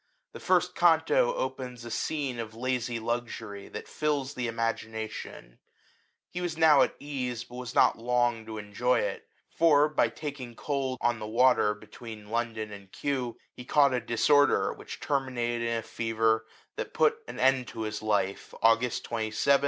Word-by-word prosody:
The - - -9
first - - +2
canto - - +4
opens 125 - -4
a 120 - -7
scene 140 -4 -2
of 110 -1 -6
lazy 125 0 -1
luxury, 115 -3 -4
that - - -8
fills 145 -3 -1
the 125 -3 -2
imagin 115 -1 -2
ation* 110 - -7 0.7
He 180 - -4
was 175 -3 -3
now 160 -3 +6
at - - +2
ease, 125 -4 -4
but 120 - -17
was 125 -2 -6
not - - +4
long 120 -1 +1
to 110 -1 -6
enjoy 105 +4 +1
it; - - -4 0.2
for, 150 -3 +5
by 150 -6 +2
taking 130 -1 -7
cold 135 -2 -2
on 120 -1 +1
the 105 - -5
water 115 -2 +4
be 105 - -15
tween 110 -1 -10
London 115 -2 -2
and 100 -2 -11
Kew, 125 -5 -2 0.2
he 125 - -8
caught 140 +1 +4
a 125 - 0
disor^ 145 +6 +4
der, - - +1
which - - -9
terminated 125 -4 -1
in 115 0 0
a 115 - -4
fever 110 0 0 0.3
that - - -5
put 455 0 +3
an - - -7
end 130 -1 +3
to - - -7
his 105 -1 -3
life, 100 -3 -1
August 115 +2 +3
27, 115 -2 -2
1743. 140 +6 +3
120 Hz, 175 wpm, -29 LUFS, 110-135 Hz, 0.7 s, now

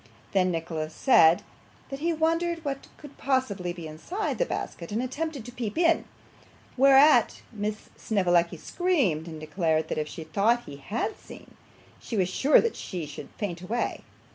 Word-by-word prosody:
Then 185 -2 +3
Nicholas 160 -2 -3
said, 170 -11 +5 0.5
that 275 - -5
he 335 +3 0
wondered 330 +1 0
what 275 -1 -4
could 290 -2 -13
possibly 220 -10 0
be 175 -2 -8
inside 165 - -4
the - - +1
basket, 170 +1 -5
and 215 - -1
attempted 275 +1 -3
to 245 - -8
peep 235 -2 -5
in, 335 -1 +3 0.7
whereat 270 -1 +5
Miss 210 0 -4
Snevellicci 175 -5 +1
screamed, 240 - 0
and 160 -2 -7
declared 160 0 0
that - - -1
if 150 - -2
she 160 +2 -7
thought 215 +9 +1
he 140 - -10
had 210 - -3
seen, - - -13 0.4
she 225 - -5
was 185 -2 +2
sure 275 +10 +5
she 175 -5 -5
should 145 -1 -9
faint 175 -5 -4
away. 220 +7 -2
210 Hz, 160 wpm, -27 LUFS, 170-275 Hz, 0.7 s, said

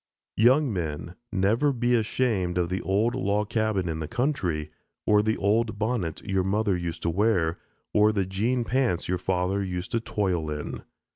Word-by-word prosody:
Young 125 +3 +4
men, 85 -2 -4 0.2
never 110 +10 +2
be 120 -1 +1
ashamed 110 -6 +1
of 85 -1 +1
the 95 +1 -2
old 105 +5 +1
log 100 +1 0
cabin 110 -5 0
in 80 -1 -2
the 75 - -4
country, 85 - -1 0.3
or 105 0 +5
the 110 +1 0
old 110 +2 +1
bonnet 110 -7 -2
your 95 -2 0
mother 100 +1 +1
used 85 -1 -4
to 85 - +1
wear, 90 -4 +1 0.3
or 105 +1 +5
the 100 -3 0
jean 115 +7 0
pants 125 -8 0
your 90 0 0
father 95 +2 0
used 90 0 -4
to 115 - +1
toil 95 -8 -1
in. 75 -1 -5
100 Hz, 170 wpm, -26 LUFS, 90-115 Hz, 0.3 s, or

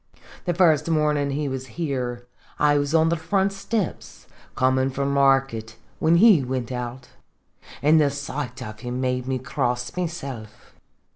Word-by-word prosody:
"The 175 - 0
first 160 -3 +3
mornin' 150 -3 +1
he 145 +1 -2
was 130 -1 -4
here, 125 -7 -3 0.3
I 145 0 +3
was 145 +2 -1
on 160 0 +4
the 170 - +2
front 190 +4 0
steps, 195 -1 -4 0.3
comin' 130 +1 +2
from 140 +1 -2
market, 135 -5 +2 0.2
whin 160 +2 +4
he 195 -3 +7
wint 125 -1 -3
out; 125 +1 -5 0.7
an' 155 +2 +5
the 145 -2 +4
sight 140 -2 -5
of 110 -2 -8
him 125 +1 -4
made 125 -1 -1
me 130 -1 0
cross 125 -2 -2
mysilf 135 -12 -6
140 Hz, 150 wpm, -24 LUFS, 125-155 Hz, 0.7 s, he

